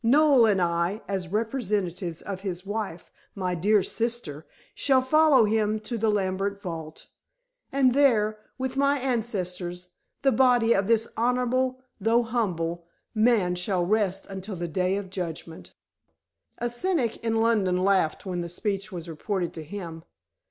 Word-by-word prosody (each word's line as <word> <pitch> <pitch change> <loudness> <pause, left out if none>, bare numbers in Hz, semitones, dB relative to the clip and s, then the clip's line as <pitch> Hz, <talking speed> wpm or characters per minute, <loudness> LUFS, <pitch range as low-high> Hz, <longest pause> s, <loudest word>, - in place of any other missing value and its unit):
Noel 270 -1 +5
and 200 -3 +3
I, 170 +4 0
as 190 -2 -2
representatives 200 -5 -2
of 195 -2 -5
his 185 -2 -5
wife, 205 -4 -5 0.2
my 185 -2 -2
dear 200 +4 +3
sister, 225 -11 -3 0.3
shall 265 -2 +3
follow 290 -3 +5
him 215 0 +1
to 235 +2 -4
the 225 -1 +1
Lambert 200 0 -1
vault, 165 -5 -7 0.7
and 265 -2 +3
there, 220 -6 +3 0.2
with 260 0 -3
my 280 +1 +3
ancestors, 180 -8 -3 0.3
the 270 - +5
body 245 -2 +4
of 195 0 +1
this 230 0 +3
honorable, 250 +2 0 0.2
though 225 +4 +3
humble, 175 -8 -2 0.3
man 215 -5 +3
shall 180 0 0
rest 195 -1 0
until 195 +1 -6
the 175 0 -4
Day 185 +3 0
of 195 -2 -6
Judgment." 165 -3 -6 0.8
A 240 - -1
cynic 240 - 0
in 225 -1 -2
London 200 -6 +2
laughed 190 -5 +2
when 180 -2 -3
the 170 - -5
speech 195 +3 -2
was 175 -2 -6
reported 175 +2 -3
to 160 - -7
him. 165 -1 -7
205 Hz, 145 wpm, -26 LUFS, 180-235 Hz, 0.8 s, Noel